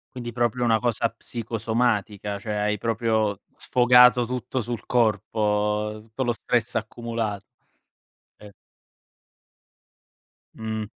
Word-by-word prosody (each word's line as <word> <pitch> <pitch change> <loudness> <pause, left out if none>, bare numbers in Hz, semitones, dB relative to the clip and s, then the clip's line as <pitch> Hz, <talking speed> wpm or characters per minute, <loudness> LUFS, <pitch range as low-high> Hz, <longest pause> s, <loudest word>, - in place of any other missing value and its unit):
Quindi 120 -2 -5
proprio 120 +1 0
una 115 -2 +3
cosa 115 -1 0
psicosomatica, 110 -3 -2
cioè 105 +1 -4
hai 105 0 0
proprio 110 -2 0 0.2
sfogato 125 0 +5
tutto 125 +1 -3
sul 120 0 -5
corpo, 105 -2 +1
tutto 115 +4 -4
lo 120 - +1
stress 120 0 -1
accumula 115 -1 -3 1.0
eh. 105 -1 -14 2.0
Mh. 110 -1 -3
115 Hz, 100 wpm, -25 LUFS, 105-120 Hz, 2.0 s, sfogato